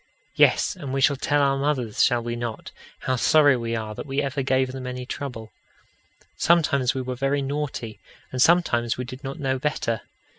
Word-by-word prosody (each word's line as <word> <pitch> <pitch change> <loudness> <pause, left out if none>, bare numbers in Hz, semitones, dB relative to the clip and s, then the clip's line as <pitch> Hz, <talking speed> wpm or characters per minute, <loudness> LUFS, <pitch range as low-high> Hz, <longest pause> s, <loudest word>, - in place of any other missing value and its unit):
Yes, - - +3
and 140 - -7
we 135 - 0
shall 140 +1 +4
tell 145 +2 +1
our 135 0 +2
mothers 135 -6 0
shall 120 -2 +2
we 120 0 -3
not? 120 -2 -5 0.3
how 130 - 0
sorry 145 +2 +5
we 115 -1 -2
are 110 -1 -4
that 125 - -7
we 135 +1 -1
ever 140 0 -1
gave 130 0 +1
them 130 -1 -6
any 125 0 -5
trouble. 125 -5 -6 0.8
Sometimes 140 -7 +2
we 130 - -2
were 130 0 -3
very 135 +2 0
naughty, 135 -7 -4 0.3
and 130 - -2
sometimes 120 -9 +3
we 125 - -3
did 130 +3 -10
not 135 0 -6
know 130 -2 -1
better. 130 -6 -1
130 Hz, 190 wpm, -24 LUFS, 120-140 Hz, 0.8 s, sorry